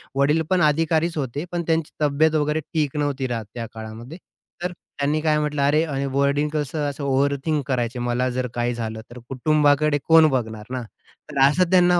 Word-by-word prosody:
वडील 145 +4 +3
पण 185 -2 +2
अधिकारीच 160 +2 +2
होते 140 +2 -3
पण 175 -1 -1
त्यांची 160 -2 0
तब्येत 150 +2 +3
वगैरे 150 0 +1
ठीक 150 -2 -2
नव्हती 145 -2 -1
राहतं 115 -4 -4
त्या 115 -1 -5
काळामध्ये. 110 +7 -8 0.5
तर 180 - -1
त्यांनी 150 -3 -3
काय 155 -1 +2
म्हटलं, 150 -1 -1
अरे 150 +3 +3
आणि 140 -4 -2
वडील 140 +2 +1
कसं 150 0 -1
असं 145 +1 -6
ओव्हर 140 +1 +2
थिंक 155 -3 0
करायचे. 125 -2 -1
मला 120 +1 0
जर 125 0 -2
काही 120 0 0
झालं 110 -2 -5
तर 125 - -9
कुटुंबाकडे 145 +2 +2
कोण 160 -1 +7
बघणार 110 -5 -3
ना, 130 -1 -2 0.5
तर - - -3
असं 170 +5 +2
त्यांना 180 -1 +5
145 Hz, 185 wpm, -23 LUFS, 130-155 Hz, 0.5 s, कोण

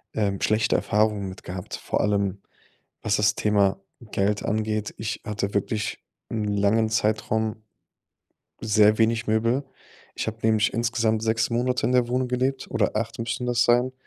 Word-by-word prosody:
ähm, 100 -3 0
schlechte 110 +1 +2
Erfahrungen 105 -2 +1
mit 95 - -11
gehabt, 90 0 -6
vor - - -2
allem, 100 -1 0 0.6
was 105 -2 +1
das 105 0 +3
Thema 100 -2 +2 0.3
Geld 100 +1 0
angeht. 110 0 -1
Ich 110 +1 -4
hatte 100 -1 -3
wirklich 105 +2 -2 0.3
'nen 105 -2 -1
langen 105 +2 +2
Zeitraum 110 0 0 1.0
sehr 105 0 +4
wenig 115 +1 +2
Möbel. 115 +5 +1 0.5
Ich - - -3
habe 110 0 -4
nämlich 110 0 +2
insgesamt 115 -2 0
6 110 0 +1
Monate 125 +1 0
in 125 - +1
der 125 -1 +3
Wohnung 125 +1 0
gelebt, 130 +2 -1
oder - - 0
8 115 +1 -3
müssten 120 +2 -3
das 120 -2 +2
sein. 125 +2 +3
110 Hz, 155 wpm, -25 LUFS, 105-115 Hz, 1.0 s, sehr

